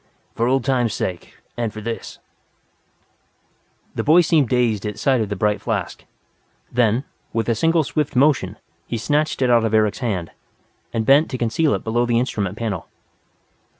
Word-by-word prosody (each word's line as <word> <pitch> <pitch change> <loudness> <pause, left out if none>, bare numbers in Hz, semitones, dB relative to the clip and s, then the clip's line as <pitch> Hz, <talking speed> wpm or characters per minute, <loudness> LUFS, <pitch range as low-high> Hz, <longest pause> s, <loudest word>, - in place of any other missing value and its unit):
"For 115 - 0
old 130 -1 +1
time's 120 -6 +1
sake, 90 -2 -4 0.2
and 115 -2 -2
for 110 - -8
this 115 +2 -6 0.9
" - - -42
The - - -2
boy 160 +4 +6
seemed 155 -7 +2
dazed 120 -5 +1
at 105 -1 -4
sight 130 -3 +2
of 105 - -2
the 105 - -2
bright 105 +1 0
flask. - - -3 0.7
Then, 120 +1 +2 0.3
with 115 0 -1
a 115 - +3
single 165 +7 +2
swift 150 -1 -2
motion, 130 -8 +2 0.3
he 120 - -3
snatched 150 +4 0
it 125 - +3
out 120 -1 +4
of 110 -1 +1
Eric's 105 -2 +2
hand, 100 -10 -2 0.6
and 110 -1 -1
bent 140 +5 +5
to 130 - -3
conceal 125 +6 +1
it - - -5
below 120 +2 0
his 120 -1 +2
instrument 105 -5 -1
panel. 110 -7 -3
120 Hz, 175 wpm, -21 LUFS, 110-135 Hz, 0.9 s, boy